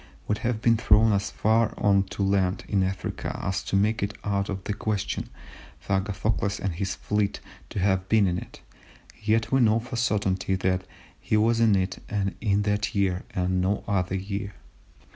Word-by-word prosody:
would 105 Hz, -, 0 dB
have 115 Hz, -2 st, -2 dB
been 115 Hz, -1 st, +4 dB
thrown 110 Hz, 0 st, +5 dB
so 100 Hz, -, -5 dB
far 110 Hz, +1 st, +2 dB
on 100 Hz, -2 st, +4 dB
to 100 Hz, +1 st, -4 dB
land, 95 Hz, -1 st, +1 dB
in 100 Hz, -2 st, +1 dB
Africa, 95 Hz, 0 st, -3 dB
as 95 Hz, 0 st, -2 dB
to -, -, -3 dB
make 105 Hz, +3 st, +2 dB
it 100 Hz, +1 st, -2 dB
out 100 Hz, -1 st, -1 dB
of 95 Hz, -2 st, -4 dB
the 105 Hz, -, -2 dB
question 105 Hz, -1 st, -2 dB, 0.5 s
for -, -, -3 dB
Agathocles 100 Hz, 0 st, -1 dB
and 95 Hz, -2 st, -2 dB
his 95 Hz, +2 st, -2 dB
fleet 105 Hz, -1 st, -1 dB, 0.3 s
to -, -, -7 dB
have 95 Hz, -1 st, +1 dB
been 110 Hz, -2 st, +4 dB
in 90 Hz, -1 st, 0 dB
it, -, -, -12 dB, 0.6 s
yet 110 Hz, +1 st, +1 dB
we 135 Hz, 0 st, +4 dB
know 110 Hz, -1 st, +4 dB
for 120 Hz, +2 st, -10 dB
a -, -, -1 dB
certainty 95 Hz, -5 st, +1 dB
that 95 Hz, 0 st, -1 dB, 0.3 s
he 110 Hz, -, 0 dB
was 115 Hz, +2 st, +3 dB
in 115 Hz, -3 st, +5 dB
it 95 Hz, 0 st, -1 dB, 0.4 s
in 105 Hz, -2 st, +2 dB
that 105 Hz, +1 st, -1 dB
year, 95 Hz, -2 st, +1 dB
and 90 Hz, 0 st, +1 dB
no 95 Hz, +3 st, 0 dB
other 95 Hz, -2 st, 0 dB
year. 100 Hz, +1 st, -4 dB
100 Hz, 185 wpm, -26 LUFS, 95-110 Hz, 0.6 s, thrown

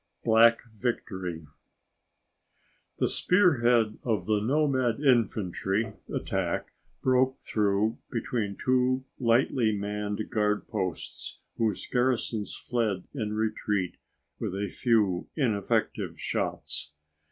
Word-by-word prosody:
Black 115 Hz, +1 st, +5 dB
Victory 95 Hz, -8 st, -3 dB, 1.5 s
The -, -, +2 dB
spearhead 120 Hz, -, +3 dB
of 110 Hz, -7 st, 0 dB
the 105 Hz, -1 st, +1 dB
nomad 130 Hz, -1 st, +1 dB
infantry 110 Hz, -, +1 dB, 0.2 s
attack -, -, -2 dB, 0.3 s
broke 130 Hz, 0 st, +3 dB
through 105 Hz, +1 st, 0 dB
between 110 Hz, -4 st, -2 dB
two 130 Hz, 0 st, +1 dB
lightly 115 Hz, -2 st, +2 dB
manned 105 Hz, +1 st, -3 dB
guard 105 Hz, -1 st, +1 dB
posts 90 Hz, -3 st, -4 dB, 0.2 s
whose 110 Hz, -4 st, 0 dB
garrisons 125 Hz, -4 st, 0 dB
fled 110 Hz, -7 st, -1 dB
in 110 Hz, -6 st, -3 dB
retreat 105 Hz, -5 st, -1 dB, 0.4 s
with 105 Hz, -4 st, -3 dB
a 100 Hz, 0 st, -2 dB
few 105 Hz, -7 st, +2 dB
ineffective 110 Hz, -, 0 dB
shots. 75 Hz, -, -3 dB
110 Hz, 95 wpm, -28 LUFS, 105-125 Hz, 1.5 s, Black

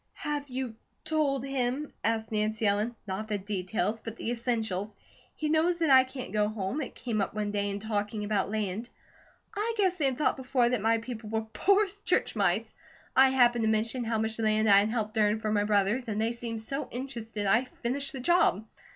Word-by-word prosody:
"Have 290 Hz, -1 st, -3 dB
you 255 Hz, -3 st, -4 dB, 0.3 s
told 280 Hz, -4 st, 0 dB
him 275 Hz, +2 st, -1 dB
?" -, -, -43 dB
asked 225 Hz, 0 st, 0 dB
Nancy 215 Hz, +1 st, 0 dB
Ellen. 210 Hz, +4 st, +1 dB
"Not 205 Hz, +2 st, -4 dB
the 210 Hz, -1 st, -1 dB
details, 205 Hz, +2 st, -2 dB
but 225 Hz, -1 st, -6 dB
the 235 Hz, -, -3 dB
essentials. 220 Hz, -4 st, -2 dB, 0.4 s
He 310 Hz, -, -2 dB
knows 320 Hz, +3 st, +2 dB
that 325 Hz, -4 st, +2 dB
I 260 Hz, -1 st, +8 dB
can't 260 Hz, 0 st, -7 dB
go 210 Hz, -1 st, +2 dB
home. 215 Hz, +6 st, -3 dB
It -, -, -6 dB
came 225 Hz, -4 st, -2 dB
up 195 Hz, -, -2 dB
one 210 Hz, -1 st, -1 dB
day 205 Hz, 0 st, -1 dB
in 200 Hz, 0 st, -3 dB
talking 210 Hz, 0 st, -2 dB
about 205 Hz, -2 st, 0 dB
land. 215 Hz, +2 st, -2 dB, 0.7 s
I 440 Hz, +3 st, -1 dB
guess 375 Hz, -3 st, +2 dB
they 295 Hz, -, +2 dB
had 265 Hz, -2 st, +1 dB
thought 300 Hz, -, +1 dB
before, 250 Hz, -2 st, +1 dB
that 245 Hz, -4 st, 0 dB
my 225 Hz, +2 st, +3 dB
people 225 Hz, -2 st, -7 dB
were 220 Hz, 0 st, 0 dB
poor 400 Hz, +2 st, +4 dB
as 405 Hz, +1 st, -8 dB
church -, -, +1 dB
mice. -, -, +1 dB, 0.4 s
I 265 Hz, 0 st, +7 dB
happened 240 Hz, -3 st, +4 dB
to 220 Hz, -, +2 dB
mention 225 Hz, +3 st, 0 dB
how 225 Hz, -1 st, -1 dB
much 220 Hz, +1 st, -2 dB
land 215 Hz, 0 st, +2 dB
I 200 Hz, -1 st, +8 dB
had 205 Hz, +2 st, +1 dB
helped 220 Hz, -1 st, -2 dB
earn 210 Hz, 0 st, +3 dB
for 215 Hz, -1 st, -2 dB
my 205 Hz, -1 st, +2 dB
brothers, 210 Hz, +4 st, +1 dB
and 215 Hz, -1 st, -2 dB
they 225 Hz, +2 st, +1 dB
seemed 230 Hz, -2 st, -4 dB
so 275 Hz, +5 st, -4 dB
interested 230 Hz, -5 st, -5 dB
I 225 Hz, +6 st, +3 dB, 0.2 s
finished 275 Hz, +4 st, 0 dB
the 265 Hz, -, -6 dB
job. 250 Hz, -, +3 dB
225 Hz, 210 wpm, -29 LUFS, 210-260 Hz, 0.7 s, I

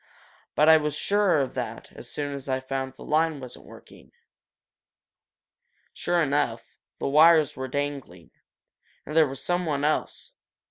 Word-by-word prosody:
But 150 Hz, -, +4 dB
I 160 Hz, 0 st, +8 dB
was 150 Hz, -1 st, -2 dB
sure 200 Hz, -1 st, +2 dB
of 135 Hz, -, -3 dB
that -, -, -6 dB
as -, -, -10 dB
soon 145 Hz, -1 st, -4 dB
as 140 Hz, -1 st, -8 dB
I 130 Hz, 0 st, 0 dB
found 130 Hz, 0 st, -4 dB
the -, -, -12 dB
line 155 Hz, -1 st, +1 dB
wasn't 125 Hz, -2 st, -11 dB
working." -, -, -16 dB, 1.8 s
Sure 175 Hz, -1 st, 0 dB
enough, 145 Hz, 0 st, -2 dB, 0.2 s
the -, -, -3 dB
wires 155 Hz, +1 st, +5 dB
were 130 Hz, 0 st, -5 dB
dangling. 140 Hz, -, -5 dB, 0.7 s
And 150 Hz, -, -7 dB
there 160 Hz, -2 st, +5 dB
was 135 Hz, 0 st, -6 dB
something 170 Hz, -5 st, -1 dB
else. 155 Hz, +1 st, -2 dB
145 Hz, 145 wpm, -25 LUFS, 135-160 Hz, 1.8 s, I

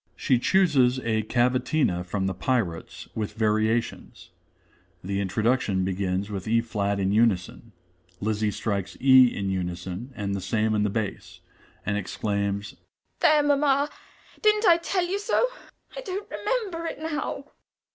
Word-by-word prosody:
(_She 125 Hz, -2 st, +2 dB
chooses 140 Hz, -10 st, +3 dB
a 110 Hz, -1 st, +1 dB
cavatina 125 Hz, -, +1 dB
from 95 Hz, +2 st, -2 dB
"The 95 Hz, -, 0 dB
Pirates," 95 Hz, -6 st, -2 dB
with 110 Hz, -2 st, -3 dB
variations. 110 Hz, +1 st, -1 dB, 0.7 s
The 100 Hz, +2 st, -2 dB
introduction 100 Hz, -1 st, +1 dB
begins 95 Hz, +1 st, -2 dB
with 95 Hz, -1 st, -5 dB
e 115 Hz, +1 st, +3 dB
flat 100 Hz, -3 st, -2 dB
in 95 Hz, 0 st, +1 dB
unison. 110 Hz, 0 st, +1 dB, 0.5 s
Lizzie 110 Hz, 0 st, 0 dB
strikes 100 Hz, -2 st, -3 dB
e 130 Hz, -1 st, +7 dB
in 100 Hz, -4 st, -3 dB
unison 90 Hz, +5 st, -4 dB
and 100 Hz, -3 st, -3 dB
the 100 Hz, -, -3 dB
same 110 Hz, +2 st, 0 dB
in 105 Hz, -, +1 dB
the 105 Hz, -, +1 dB
bass, 95 Hz, -3 st, -4 dB, 0.4 s
and 100 Hz, -, 0 dB
exclaims: 100 Hz, 0 st, -2 dB, 0.4 s
"There, 305 Hz, -3 st, +5 dB
mamma, 285 Hz, 0 st, +2 dB, 0.5 s
didn't 425 Hz, 0 st, +3 dB
I 340 Hz, -3 st, +7 dB
tell 350 Hz, +1 st, -1 dB
you 385 Hz, +3 st, -2 dB
so? 425 Hz, +4 st, +2 dB, 0.5 s
I -, -, -5 dB
don't 405 Hz, -2 st, -5 dB
remember 380 Hz, -10 st, -2 dB
it -, -, -5 dB
now." 300 Hz, -3 st, -4 dB
110 Hz, 140 wpm, -26 LUFS, 100-155 Hz, 0.7 s, e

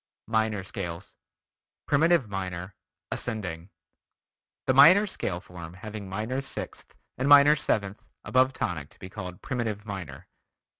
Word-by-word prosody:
MINOR 110 Hz, -3 st, 0 dB
SCALES 90 Hz, -2 st, -6 dB, 0.7 s
Primitive 160 Hz, -2 st, +3 dB
Minor 95 Hz, -2 st, -5 dB, 0.4 s
(ascending) 95 Hz, -7 st, -4 dB, 1.0 s
The 130 Hz, -, +3 dB
minor 170 Hz, +10 st, +8 dB
scale 95 Hz, -, -3 dB
form 90 Hz, -3 st, -10 dB
having 105 Hz, 0 st, -8 dB
minor 110 Hz, +7 st, -2 dB
sixth 135 Hz, -, -7 dB, 0.2 s
and 135 Hz, +2 st, +1 dB
minor 145 Hz, +1 st, +8 dB
seventh 100 Hz, -8 st, -2 dB, 0.2 s
above 130 Hz, +1 st, +3 dB
tonic 75 Hz, -, -3 dB
to -, -, -19 dB
be 95 Hz, -, -9 dB
called 90 Hz, -3 st, -8 dB
Primitive 110 Hz, -5 st, -3 dB
Minor. 95 Hz, -, -7 dB
105 Hz, 120 wpm, -27 LUFS, 90-130 Hz, 1.0 s, minor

